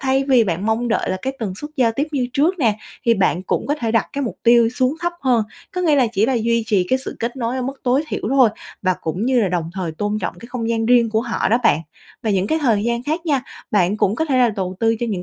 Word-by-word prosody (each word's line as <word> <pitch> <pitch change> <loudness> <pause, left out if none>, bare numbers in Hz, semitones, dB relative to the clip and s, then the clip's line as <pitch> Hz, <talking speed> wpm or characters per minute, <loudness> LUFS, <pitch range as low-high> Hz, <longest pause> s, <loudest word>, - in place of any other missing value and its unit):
thay 270 0 +1
vì 255 -5 +4
bạn 185 +2 -2
mong 230 +2 0
đợi 230 - 0
là 185 - -1
cái 265 - -2
tần 200 -5 -3
suất 295 +8 -8
giao 235 -3 +3
tiếp 290 +3 0
như 255 -3 0
trước 330 +6 +1
nè, 220 -6 +2 0.3
thì 230 -1 +4
bạn 185 -2 +1
cũng - - -2
có 290 - +1
thể 235 -6 -2
đặt 225 - +2
cái 280 - -2
mục 235 - -4
tiêu 235 -1 +5
xuống 255 +3 0
thấp 345 0 -1
hơn, 245 -5 +2 0.3
có 365 - -1
nghĩa 310 -5 +3
là 255 -3 +4
chỉ 215 +2 +2
là 265 - +1
duy 230 0 +1
trì 195 -5 +2
cái 260 - +2
sự - - -6
kết 235 +3 -3
nối 240 +1 -2
ở 255 - -2
mức 270 +2 -5
tối 255 +4 +2
thiểu - - -4
thôi, 265 -4 +5 0.3
và 185 -1 +2
cũng 180 +9 -2
như 255 -2 +3
là 200 - +1
đồng 170 -2 -2
thời 180 -4 -3
tôn 205 +5 -2
trọng 175 -1 -3
cái 235 - -10
không 230 -3 -3
gian 225 -1 0
riêng 240 -2 +4
của 220 0 +1
họ 235 -1 -1
đó 230 +3 +3
bạn. 160 - +4 0.4
Và 220 - 0
những 195 0 +1
cái 315 - +1
thời 220 -5 +2
gian 235 0 -1
khác 320 +5 -3
nha, 275 -4 +1 0.3
bạn 200 0 +2
cũng 205 0 +1
có 320 - 0
thể 265 -4 +1
là 245 -2 +4
tầu 185 -1 -3
tư 225 0 +2
cho 240 - 0
những 185 -4 -3
235 Hz, 290 wpm, -20 LUFS, 210-260 Hz, 0.4 s, tiêu